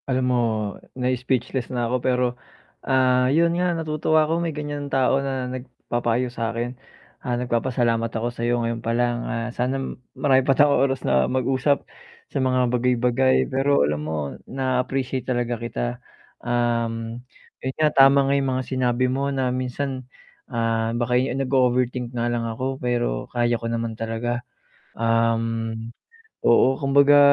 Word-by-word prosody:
Alam 130 0 +1
mo, 125 - +2 0.6
na-speechless 125 0 -1
na 120 -2 -1
'ko. 125 - +1
Pero 125 0 +2 0.6
ah, 130 -1 +3
yun 165 +4 +3
nga, 175 0 0
natutuwa 155 0 +1
ako, 165 +2 0
may 170 - -1
ganyan 145 -2 -5
tao 135 0 +2
na 135 -2 -2
nagpapayo 125 -1 -2
sa 115 -2 -2
akin. 120 +2 -3 0.5
Ah, 120 -2 -2
nagpapasalamat 120 -1 0
ako 115 +2 -3
sayo 120 +1 0
ngayon 115 0 -2
pa 115 +1 -1
lang. 120 -1 +1
Ah, 115 0 -2
sana 125 +2 -1 0.4
marami 135 -3 +4
pa 135 0 +1
tayong 145 0 +5
oras 135 -1 -3
na 65 0 +2
mag-usap 130 +2 +1 0.5
sa - - -1
mga 130 -1 +2
bagay-bagay. 125 +1 +2
Pero 135 - +3
alam 75 +1 -1
mo, 80 +1 -3 0.3
na-appreciate 130 0 -1
talaga 120 -2 -1
kita. - - -3 0.4
Um, 115 -1 -1 0.4
yun 130 0 -3
nga 155 -1 +2
tama 135 0 +6
nga 135 - +2
yung 140 -1 +1
mga 130 - -2
sinabi 125 -1 0
mo 135 +2 0
na 130 -2 0
minsan, 130 0 -3 0.4
ah, 115 -1 0
baka 120 0 -1
eh 130 - -1
nag-o-overthink 125 -2 +1
nga 120 -1 -2
lang 120 0 0
ako 130 +4 -4
pero 120 - -1
kaya 120 0 +1
ko 115 - -3
naman 115 -1 -2
talaga. 115 +2 -3 0.6
Um, 115 0 +1 0.7
oo, 130 +3 +4
kumbaga 140 +1 +5
125 Hz, 150 wpm, -23 LUFS, 120-135 Hz, 0.7 s, tama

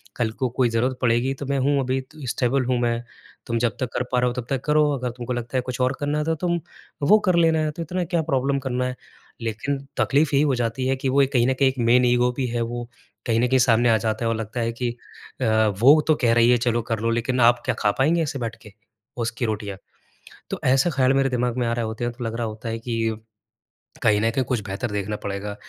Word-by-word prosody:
कल 115 -2 -1
को 130 - +1
कोई 125 0 +1
ज़रूरत 125 +3 0
पड़ेगी 125 +2 +2
तो 140 +1 -7
मैं 140 +1 -1
हूँ। 140 +2 +2
अभी 130 +1 -1
त 135 +4 -17
स्टेबल 130 +2 0
हूँ 125 0 +1
मैं। 120 -1 0 0.5
तुम 115 - 0
जब 120 0 0
तक 130 -3 -2
कर - - 0
पा 125 - +2
रहे 125 - +2
हो 120 - -1
तब 125 -2 -5
तक 135 -2 -1
करो, 150 0 +3
अगर 130 -3 -2
तुमको 120 +1 -5
लगता 120 +1 -3
है - - +2
कुछ 125 0 -6
और 125 +1 +2
करना 145 +1 -1
है 150 - 0
तो 160 0 0
तुम 175 +1 -1 0.5
वो 215 +1 +7
कर 185 -2 +3
लेना, 160 -2 +3
तो 165 - -7
इतना 180 +3 -2
क्या 170 -1 0
प्रॉब्लम 140 -2 0
करना 125 -1 -2
है।" 125 0 -3 0.5
लेकिन 115 +5 -2 0.2
तक़लीफ़ 145 +2 +2
यही 140 - +4
हो 140 -3 +2
जाती 120 +2 -1
है 135 - +2
कि 130 0 -2
वो 140 +2 +4
कहीं 120 -2 +3
न 130 - +2
कहीं 135 -1 +5
एक 130 - -6
मैन 125 +1 +5
ईगो 125 0 +3
भी 130 - 0
है 120 0 -2
वो। 120 +1 -4 0.4
कहीं 115 -1 +2
न 125 - +2
कहीं 130 +1 +3
सामने 120 0 +4
आ 110 - +5
जाता 110 +1 -2
है - - +1
और 115 - 0
लगता 110 +2 -5
है 115 0 0
कि 120 +1 -2 0.5
अ, - - +1 0.3
वो 140 +7 +7
तो 155 - +4
कह 115 -1 +4
रही 120 0 +4
है, 125 - +5
"चलो 120 -1 0
कर 115 - 0
लो" 115 +1 0
लेकिन 125 +2 -1
आप 120 0 0
क्या 125 - 0
खा 105 - +2
पाएँगे 160 +5 +3
ऐसे 140 -2 -4
बैठ 115 -1 -4
के, 105 -3 -14 0.4
उसकी 120 0 -2
रोटियाँ? 105 -3 -3 0.7
तो - - -4
ऐसा 135 +6 +3
ख़्याल 135 -3 +2
मेरे 135 0 +2
दिमाग 125 -1 -1
में 120 - +1
आ 115 - 0
रहे 120 -1 -2
होते 110 +2 -4
हैं 120 - -2
तो 120 0 -7
लग 115 0 -3
रहा 120 -1 -2
होता 110 +2 -6
है 115 0 -3
कि 115 -1 -2 0.9
कहीं 105 -1 +4
न 115 - +2
कहीं 130 +3 0
कुछ 120 0 -1
बेहतर 105 +4 -4
देखना 105 +1 -2
पड़ेगा, 100 +1 -4
125 Hz, 260 wpm, -23 LUFS, 115-135 Hz, 0.9 s, वो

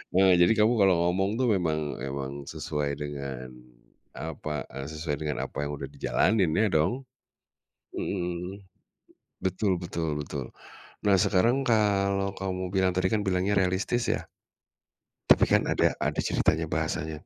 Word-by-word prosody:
eee, 95 -1 +6
jadi 90 +6 +6
kamu 115 +3 +4
kalau 95 -2 +5
ngomong 95 +4 0
tuh 130 - +2
memang 80 -7 -1
memang 70 0 -4
sesuai 75 -1 -3
dengan, 70 -3 -5 0.7
apa, 75 -1 -4
eee, 70 +1 -5
sesuai 75 -1 -3
dengan 75 -1 -2
apa 70 - -4
yang - - -4
udah 70 - -5
dijalanin 90 +5 +2
ya 110 - +3
dong, 90 - +1 0.9
mhm, 90 +1 -3 0.8
betul 95 -1 0
betul 80 -3 -2
betul. - - -5 0.6
Nah 100 -2 +5
sekarang 115 +10 +3
kalau, 100 -3 +2
kamu 95 -1 -3
bilang 95 -1 +3
tadi 95 0 +2
kan 105 -1 +1
bilangnya 95 +2 +1
realistis 95 +6 +1
ya? - - -3 1.0
Tapi - - +7
kan - - +5
ada - - +3
ada - - 0
ceritanya 80 +1 +1
bahasanya, 80 -2 -2
90 Hz, 140 wpm, -27 LUFS, 75-100 Hz, 1.0 s, Tapi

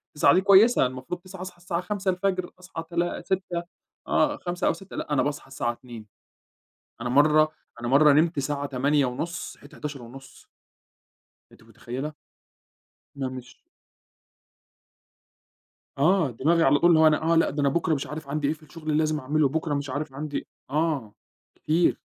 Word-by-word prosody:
21:00 - - +5
دي 185 - +4
كويسة، 200 - +6
المفروض 130 +8 -5
21:00 185 0 -11
أصحى 185 -1 -8
الساعة 175 0 -3
05:00 185 -1 -1
أصحى 180 -2 -7
تلا 175 0 -1
06:00 185 -2 -2 0.4
آه، - - +2
05:00 175 0 -2
أو - - +3
06:00 190 +3 -11
لأ، 150 - -3
أنا 140 - +3
باصحى 145 -1 -3
الساعة 135 -3 -2
02:00 120 -2 -11 1.0
أنا 120 - -3
مَرّة 155 +4 +4 0.3
أنا 120 - -3
مَرّة 145 +3 +6
نمت 160 +2 +3
ساعة 145 +1 -2
20:30 140 +4 -1
صحيت 145 - -17
23:30 135 -2 -9 1.0
أنتِ - - -19
مُتخيّلة؟ 135 +6 -6 1.0
لأ، 135 -2 -3
مش 130 -1 -10 2.4
آه، 160 -1 +3
دماغي 165 +8 +2
على 145 0 +4
طول 175 - +5
اللي 165 -2 +5
هو 160 - +7
أنا 155 -1 +3
آه، - - +4
لأ، 165 - +4
ده 145 +1 -2
أنا 140 - +3
بكرة 165 +2 +1
مش 140 - -2
عارف 150 -1 -7
عندي 145 0 -1
إيه 150 - +1
في 155 0 -18
الشُّغل 155 -1 -3
لازم 155 -1 +1
أعملُه، 150 +2 +1
بكرة 155 +1 -2
مش 140 0 -2
عارف 145 +1 -4
عندي 145 +1 -5 0.2
آه 145 -7 -1 0.4
كتير، 165 +3 +1
150 Hz, 160 wpm, -26 LUFS, 140-170 Hz, 2.4 s, هو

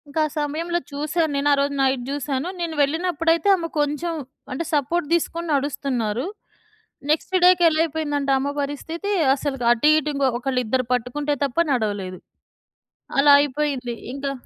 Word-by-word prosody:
ఇంకా 285 +2 -3
ఆ - - -10
సమయంలో 325 +4 -1
చూశాను 305 +3 -1
నేను. 280 +1 0
ఆ - - +5
రోజు 280 0 0
నైట్ 265 -2 +1
జూసాను. 280 +1 -2
నేను 330 -2 -3
వెళ్ళినప్పుడైతే 330 +3 +1
ఆమె 340 -3 -4
కొంచెం 295 +4 -1 0.4
అంటే 260 +6 -2
సపోర్ట్ 295 +3 0
తీసుకొని 340 0 -1
నడుస్తున్నారు! 255 -4 -1 0.9
నెక్స్ట్ 325 +4 0
డేకి 360 -1 +6
ఎలా 310 0 -1
అయిపోయిందంటే 290 -3 -2
అమ్మ 275 +2 -1
పరిస్థితి 320 +7 -4 0.2
అసలు 280 0 -3
అటు 240 +5 +3
ఇటు 300 0 -3 0.3
ఒకళ్ళు 255 0 -1
ఇద్దరు 255 +3 0
పట్టుకుంటే 285 +5 -1
తప్ప 270 0 -6 0.2
నడవలేదు! 205 -6 -2 1.0
అలా 285 +1 +6
అయిపోయింది. 280 -3 -2 0.2
ఇంకా 275 0 -3
290 Hz, 140 wpm, -22 LUFS, 265-320 Hz, 1.0 s, డేకి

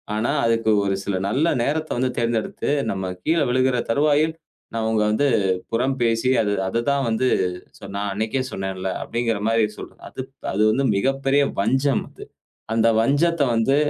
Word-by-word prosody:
ஆனா, 110 +4 0
அதுக்கு 115 -1 +2
ஒரு 95 - +1
சில 100 - -1
நல்ல 135 +9 +1 0.2
நேரத்தை 155 +4 -1
வந்து 130 0 +1
தேர்ந்தெடுத்து, 115 +2 -1 0.2
நம்ம 95 -1 -3
கீழே 160 -2 +2
விழுகிற 130 0 +2
தருவாயில். 150 +4 +2 0.5
அவங்க 110 -1 +1
வந்து 140 +7 +1 0.5
புறம் 130 +4 +1
பேசி, 115 +1 +2 0.4
"அதுதான் 135 +7 0
வந்து 115 +3 +1 0.7
நான் 100 0 -2
அன்றைக்கே 110 +6 -1
சொன்னேன்ல." 95 -1 -4
அப்படிங்கற 115 -3 -1
மாரி 115 0 +3
சொல்றேன். - - -11
அது - - -7 0.3
அது 100 +3 0
வந்து 135 +6 +1
மிகப்பெரிய 135 +5 +1 0.2
வஞ்சம் 135 +6 +1
அது. - - -12 0.5
அந்த 115 0 +3
வஞ்சத்தை 145 +5 +2
வந்து 115 +5 +2
120 Hz, 140 wpm, -22 LUFS, 110-140 Hz, 0.7 s, மாரி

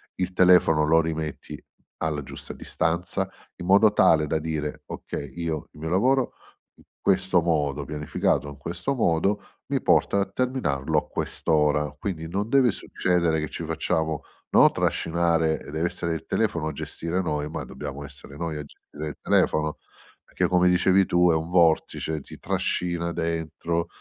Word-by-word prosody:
Il 95 0 -2
telefono 90 -4 +5
lo 80 +1 +5
rimetti 80 -2 -5 0.4
alla 75 -2 -1
giusta 70 - -9
distanza, 85 +1 -1 0.3
in 90 - -8
modo 100 +3 +6
tale 75 -1 +4
da 80 +1 0
dire: 75 -2 -4
"Okay, 70 -2 -6
io 80 -3 -3
il - - -16
mio 80 +1 -4
lavoro 125 +8 +2 0.4
in - - -21 0.2
questo 95 -2 +3
modo 75 -5 0
pianificato, 75 -1 -1
in 70 - -10
questo 85 - -3
modo 100 -3 +1 0.3
mi - - -1
porta 100 - +3
a 100 - +2
terminarlo 100 - -1
a - - 0
quest'ora." 75 -1 0
Quindi 80 -2 -4
non 100 +6 -2
deve 130 -3 +4
succedere 85 -4 0
che 80 - -3
ci 85 - -6
facciamo, 80 -1 -1 0.3
no, - - +7
trascinare, 80 -1 +1
e - - -10
dev'essere 85 +1 -2
il 80 - -7
telefono 80 -2 0
a - - -1
gestire 85 +5 -3
noi, 75 -4 -2
ma - - -4
dobbiamo 70 +1 -7
essere 70 0 -11
noi 80 -1 -3
a 75 - -5
gestire 75 +1 -10
il - - -9
telefono. 75 0 +2 0.5
Perché - - -1
come 90 0 +4
dicevi 95 +2 +4
tu 90 0 +4
è - - +2
un 80 +1 -2
vortice: 80 -2 +2
ti - - -12
trascina 85 -1 -1
dentro, 85 +1 -2
80 Hz, 160 wpm, -25 LUFS, 75-90 Hz, 0.5 s, no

